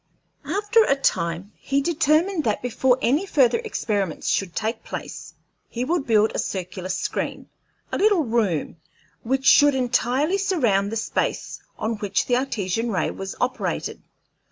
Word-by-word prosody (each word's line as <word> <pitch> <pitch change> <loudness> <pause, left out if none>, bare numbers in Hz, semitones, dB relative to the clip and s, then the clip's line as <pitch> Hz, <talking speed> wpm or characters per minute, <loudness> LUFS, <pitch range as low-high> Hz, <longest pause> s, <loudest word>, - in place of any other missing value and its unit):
After 415 +7 +3
a 275 - +2
time 180 -7 -1
he 275 +1 0
determined 320 +3 +2
that 215 0 0
before 250 +1 +2
any 290 - +2
further 275 - +3
experiments 205 - -2
should 190 -4 -1
take 220 +2 -2
place - - -8 0.3
he 245 +1 -3
would 325 -1 -1
build 220 -1 +4
a - - -2
circular 185 0 -4
screen, 185 - -3 0.4
a - - -2
little 405 -5 +4
room, 215 - -1 0.4
which 265 +3 -1
should 290 0 +6
entirely 260 +7 +1
surround 235 - +1
the - - -3
space 220 - -2 0.2
on 225 0 -2
which 205 -1 -1
the 245 - +2
Artesian 230 -4 -1
ray 190 -5 0
was 195 0 -6
operated. 250 +1 -2
245 Hz, 145 wpm, -23 LUFS, 205-295 Hz, 0.4 s, should